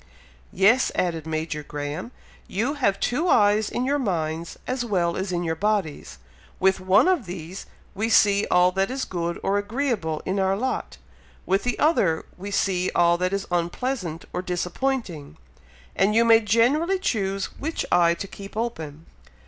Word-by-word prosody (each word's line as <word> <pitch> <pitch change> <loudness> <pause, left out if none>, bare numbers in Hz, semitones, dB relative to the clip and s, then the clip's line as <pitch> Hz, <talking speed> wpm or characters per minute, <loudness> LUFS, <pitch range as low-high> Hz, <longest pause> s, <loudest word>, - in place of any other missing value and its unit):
"Yes!" 220 +7 +4
added 165 -3 -1
Major 155 -1 -3
Graham. 150 - -5 0.4
"You 230 +9 -1
have 200 -9 0
two 305 +9 0
eyes 210 -3 +4
in 245 - -2
your 285 +2 +1
minds 165 - -2
as 255 -1 -2
well 180 -7 0
as 190 0 -3
in 175 -1 -1
your 160 -1 -1
bodies. 190 - -2 0.4
With 190 0 +3
one 190 - +4
of 350 - +1
these 175 +1 -7 0.3
we 220 +3 -1
see 205 -2 +4
all 180 0 +4
that 195 +1 0
is 260 +1 -3
good 170 -1 -3
or 200 +1 +1
agreeable 205 - -2
in 190 +2 -1
our 190 0 +1
lot 260 +4 -3 0.5
with 195 +2 +1
the 245 - -1
other 200 - +2
we 195 +3 -7
see 190 -2 0
all 170 0 +4
that 180 0 0
is 200 0 -2
unpleasant 175 0 -2
or - - -2
disappointing, 180 - -3 0.6
and 210 +2 +2
you 230 +1 +5
may 225 -1 +7
generally 245 - +2
choose 195 - -2
which 320 +3 -3
eye 170 -1 +4
to 200 - -6
keep 200 +2 -10
open. 160 -10 -4
195 Hz, 165 wpm, -24 LUFS, 170-230 Hz, 0.6 s, may